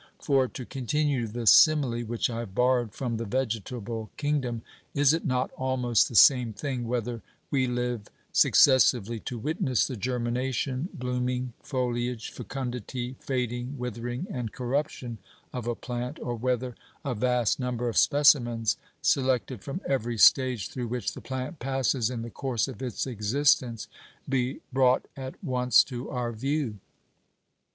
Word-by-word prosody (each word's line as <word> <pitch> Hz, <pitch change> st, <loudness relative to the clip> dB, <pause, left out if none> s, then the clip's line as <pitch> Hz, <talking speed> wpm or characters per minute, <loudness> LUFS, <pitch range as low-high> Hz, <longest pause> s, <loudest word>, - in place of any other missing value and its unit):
For, 135 Hz, -3 st, +2 dB
to 125 Hz, -, -8 dB
continue 135 Hz, 0 st, -1 dB
the 115 Hz, +2 st, -5 dB
simile 140 Hz, -3 st, +6 dB
which 120 Hz, 0 st, -1 dB
I 115 Hz, -1 st, -4 dB
have 105 Hz, -5 st, -7 dB
borrowed 125 Hz, -3 st, +2 dB
from 120 Hz, 0 st, -3 dB
the 115 Hz, -, -3 dB
vegetable 115 Hz, -1 st, -3 dB
kingdom, 135 Hz, -6 st, -1 dB, 0.3 s
is 145 Hz, 0 st, +5 dB
it 165 Hz, -, -1 dB
not 125 Hz, -1 st, 0 dB
almost 125 Hz, -3 st, +2 dB
the 120 Hz, -, -8 dB
same 125 Hz, 0 st, +6 dB
thing 125 Hz, +2 st, -3 dB
whether 120 Hz, -1 st, -2 dB, 0.3 s
we 130 Hz, -2 st, +2 dB
live 125 Hz, -3 st, -2 dB, 0.2 s
successively 120 Hz, -4 st, +5 dB
to 125 Hz, +2 st, -5 dB
witness 130 Hz, -1 st, 0 dB
the 130 Hz, -, -4 dB
germination, 125 Hz, -, -2 dB
blooming, 125 Hz, 0 st, -2 dB
foliage, 125 Hz, -3 st, -2 dB
fecundity, 125 Hz, -1 st, -5 dB
fading, 125 Hz, +1 st, -3 dB
withering, 120 Hz, -, -4 dB
and 120 Hz, -4 st, -4 dB
corruption 125 Hz, -2 st, -3 dB, 0.3 s
of 125 Hz, -2 st, -4 dB
a 120 Hz, -, 0 dB
plant, 125 Hz, +1 st, -5 dB
or 120 Hz, -, -3 dB
whether 125 Hz, +1 st, -1 dB, 0.3 s
a 135 Hz, -, 0 dB
vast 125 Hz, +1 st, +1 dB
number 125 Hz, -1 st, -2 dB
of 115 Hz, -, -2 dB
specimens, 120 Hz, -7 st, +4 dB, 0.3 s
selected 130 Hz, -4 st, +1 dB
from 140 Hz, +7 st, -5 dB
every 120 Hz, -3 st, -1 dB
stage 125 Hz, -2 st, +5 dB
through 125 Hz, -2 st, -4 dB
which 120 Hz, +1 st, -2 dB
the -, -, -9 dB
plant 130 Hz, +4 st, -5 dB
passes 130 Hz, -2 st, 0 dB
in 120 Hz, -3 st, -4 dB
the 120 Hz, -, -7 dB
course 130 Hz, -2 st, -1 dB
of 130 Hz, -4 st, -8 dB
its 125 Hz, -3 st, -2 dB
existence, 120 Hz, 0 st, +1 dB, 0.4 s
be 130 Hz, 0 st, -1 dB
brought 130 Hz, -1 st, +3 dB
at 130 Hz, -1 st, -6 dB
once 125 Hz, -2 st, +4 dB
to 125 Hz, -2 st, -6 dB
our 125 Hz, -2 st, -2 dB
view?" 130 Hz, -1 st, -2 dB
125 Hz, 145 wpm, -27 LUFS, 120-130 Hz, 0.4 s, simile